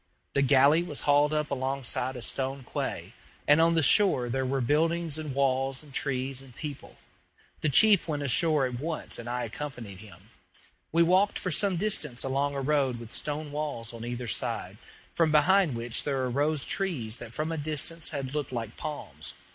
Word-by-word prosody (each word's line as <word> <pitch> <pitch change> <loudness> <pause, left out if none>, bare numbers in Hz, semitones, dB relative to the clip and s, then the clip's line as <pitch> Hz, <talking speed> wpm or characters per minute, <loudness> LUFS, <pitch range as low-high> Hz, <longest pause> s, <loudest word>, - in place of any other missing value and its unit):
The 140 - +2
galley 140 +3 +5
was 160 -5 -5
hauled 145 +1 +3
up 150 -1 -1
alongside 130 -1 -2
a 125 - -5
stone 135 +1 -3
quay, - - -3 0.3
and 150 +2 +6
on 165 0 +4
the 160 - +3
shore 135 - +5
there 130 +1 -1
were 135 +1 0
buildings 160 +4 +1
and 150 -4 -5
walls 135 0 0
and 145 -3 -15
trees 135 -1 -2
and 130 -3 -15
people. 145 -3 -8 0.6
The 155 - 0
chief 205 - +6
went 145 -2 -2
ashore 145 +2 +3
at 125 -1 -4
once 160 +3 -3
and 120 0 -6
I 125 0 -2
accompanied 115 -5 -6
him. 100 0 -14 0.6
We 170 +1 +4
walked 185 +4 +3
for 180 - -2
some 195 +2 +2
distance 155 - -2
along 140 +2 -1
a 140 - -2
road 135 -3 +1
with 115 -1 -9
stone 150 0 -3
walls 145 -6 -4
on 115 -1 -8
either 120 0 -5
side, - - -2 0.4
from 165 -2 +2
behind 160 0 +4
which 115 0 -1
there 135 -3 -1
arose 145 +4 0
trees 130 - -2
that 120 -2 -8
from 155 +2 -2
a 165 - -2
distance 155 +2 0
had 135 -3 -4
looked 150 -3 -3
like 115 -3 -5
palms. 150 -1 -6
140 Hz, 185 wpm, -28 LUFS, 125-155 Hz, 0.6 s, and